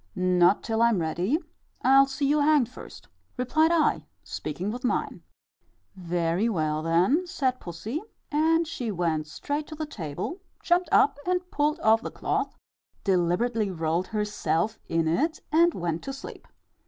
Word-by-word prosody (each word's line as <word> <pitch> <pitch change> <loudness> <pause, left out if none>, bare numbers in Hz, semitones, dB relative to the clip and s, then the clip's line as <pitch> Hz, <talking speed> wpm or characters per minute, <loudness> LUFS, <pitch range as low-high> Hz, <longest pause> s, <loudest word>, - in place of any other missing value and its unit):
"Not 180 +1 +3
till 225 0 -1
I'm 235 -3 +4
ready; 175 - 0 0.5
I'll 270 +1 +6
see 275 +1 -2
you 295 +2 +3
hanged 290 -4 +4
first," - - -12 0.3
replied 310 +6 +2
I, 325 -3 +2 0.2
speaking 175 +7 -4
with 250 +3 -6
mine. 250 - -1 0.7
"Very 175 +3 0
well, 155 -6 0
then," 180 - +2
said 260 -6 -1
pussy; 205 - -5 0.3
and 325 +2 +2
she 250 -7 -4
went 165 -5 -1
straight 290 - -4
to 310 - -8
the 310 0 -4
table, 205 - -5 0.2
jumped 355 -1 +2
up 280 0 +4
and 360 0 -1
pulled 300 +2 +1
off 220 +1 +4
the - - -5
cloth, - - -2 0.5
deliberately 200 +4 +1
rolled 165 0 -1
herself 210 -1 -1
in 165 -1 +1
it, 305 - 0
and 335 +2 +4
went 170 -2 -2
to 270 - -4
sleep. 270 - -10
225 Hz, 150 wpm, -26 LUFS, -, 0.7 s, I'll